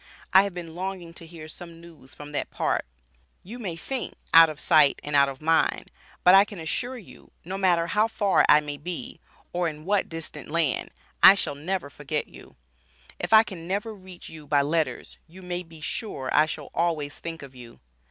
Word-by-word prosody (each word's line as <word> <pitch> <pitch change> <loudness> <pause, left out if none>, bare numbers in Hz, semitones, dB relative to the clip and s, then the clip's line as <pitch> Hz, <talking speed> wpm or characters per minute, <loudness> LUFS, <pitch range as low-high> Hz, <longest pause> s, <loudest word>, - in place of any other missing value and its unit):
I 190 - +9
have 200 -3 -6
been 170 -2 -7
longing 180 -1 -6
to 165 -1 -12
hear 160 -2 -10
some 165 +1 -9
news 165 -6 -14
from 145 0 -10
that 145 - -3
part, - - -1 0.6
you 230 +7 -9
may 190 -8 -4
think 260 +10 -5 0.2
"Out 165 0 +9
of 150 -1 -7
sight 150 -4 +4
and 145 0 -3
out 140 -1 +5
of 135 +2 -10
mind," 165 +1 +1 0.3
but 180 - +7
I 195 +1 +8
can 205 -3 -10
assure 245 +11 -3
you, 215 - -15 0.2
no 185 +3 -5
matter 180 -3 +2
how 210 +6 +2
far 205 -4 +2
I 150 - +7
may 145 -1 -6
be, 170 +3 -6 0.3
or 175 0 0
in 155 -1 -7
what 205 +1 +1
distant 165 -2 -7
land, 160 -4 0 0.3
I 190 - +10
shall 195 - -2
never 155 +1 -4
forget 150 +2 -4
you, - - -15 0.6
if - - -4
I 220 0 +8
can 175 -6 -9
never 205 +4 -2
reach 185 -3 -12
you 155 -2 -11
by 145 -1 +3
letters 155 +2 -2
you 185 +3 -14
may 180 0 -3
be 165 -3 -14
sure 150 - -4
I 150 +1 +5
shall 155 -3 -7
always 155 -4 -1
think 165 -2 -7
of 135 -1 -12
you. 120 -2 -13
165 Hz, 200 wpm, -25 LUFS, 150-190 Hz, 0.6 s, I